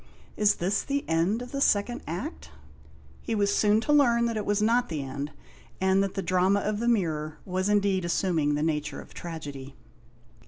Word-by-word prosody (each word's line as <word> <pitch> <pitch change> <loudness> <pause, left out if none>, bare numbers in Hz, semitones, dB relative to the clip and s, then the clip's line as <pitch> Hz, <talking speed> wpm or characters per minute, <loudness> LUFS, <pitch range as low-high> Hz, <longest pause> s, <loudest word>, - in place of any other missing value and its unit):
" - - -28
Is 210 -1 +3
this 190 +4 0
the 280 0 -3
end 170 +9 +1
of 250 - -10
the 275 - -3
second 230 +1 +2
Act? 80 - -5 0.4
" 70 0 -24
He 230 - 0
was 205 -1 +2
soon 210 +1 +3
to 295 - +1
learn 240 -5 +4
that 230 -1 -1
it 210 -2 -3
was 205 0 +2
not 235 +3 +2
the 150 -4 -3
end, 140 +2 -5 0.5
and 190 +1 +3
that 195 -1 -2
the 195 - -2
drama 185 +3 +2
of 210 +1 -2
the 235 - -1
mirror 155 -9 0
was 185 +1 -1
indeed 200 -2 +2
assuming 170 -4 +1
the 150 - -1
nature 150 -2 -2
of - - -12
tragedy. 145 -5 -7
190 Hz, 200 wpm, -27 LUFS, 155-215 Hz, 0.5 s, learn